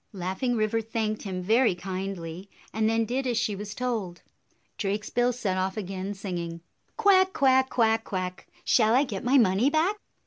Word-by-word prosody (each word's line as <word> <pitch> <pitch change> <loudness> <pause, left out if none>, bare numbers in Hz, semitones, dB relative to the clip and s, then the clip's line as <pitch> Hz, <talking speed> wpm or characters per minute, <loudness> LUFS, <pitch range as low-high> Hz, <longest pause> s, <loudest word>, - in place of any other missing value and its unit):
Laughing 190 +7 -2
River 220 0 +1
thanked 220 -1 -2
him 185 -2 -4
very 225 +1 +3
kindly, 185 -1 -6 0.2
and 220 0 +1
then 225 0 +1
did 260 +4 -2
as 240 -2 0
she 220 -3 0
was 205 +1 -7
told. 225 -8 -3 0.6
Drakesbill 215 +5 0
set 205 -6 -2
off 190 +2 -2
again, 195 0 -4
singing, 175 -4 -5 0.4
"Quack, 385 -3 +4
quack! 265 -6 +3
Quack, 225 -2 +2
quack! 185 -2 -5 0.2
Shall 225 -1 +4
I 265 - +5
get 205 -8 -5
my 260 +3 +4
money 225 +2 +4
back?" 325 +7 +1
215 Hz, 165 wpm, -27 LUFS, 190-245 Hz, 0.6 s, I